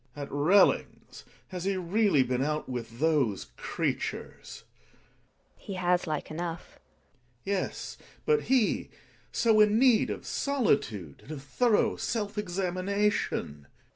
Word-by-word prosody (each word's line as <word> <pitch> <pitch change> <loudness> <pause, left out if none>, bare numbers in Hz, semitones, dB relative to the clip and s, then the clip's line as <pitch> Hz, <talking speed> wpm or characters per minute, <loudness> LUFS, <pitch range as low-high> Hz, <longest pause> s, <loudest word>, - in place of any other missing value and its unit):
At 145 -1 -6
Relling's! 155 +8 +2 0.2
Has 180 -1 -5
he 195 -1 0
really 185 -4 +3
been 125 0 -1
out 150 +1 -2
with 115 -2 -6
those 145 - +1
creatures? - - -4
GiNA. - - -33
He 200 - -6
has 180 -1 +1
like 155 -1 -3
enough. 170 +1 -6 0.6
Gregers. - - -38
Yes, 195 -1 -3 0.3
but 450 -1 +3
he 255 -4 +2 0.2
— - - -32
so 225 -2 +3
in 210 0 +5
need 245 -2 +4
of - - -5
solitude 115 - -1
and 150 - -12
of 140 -3 -8
thorough 220 - +2
self 210 -2 -2
examination. 185 - -1
GiNA. - - -35
180 Hz, 135 wpm, -29 LUFS, 145-210 Hz, 0.6 s, in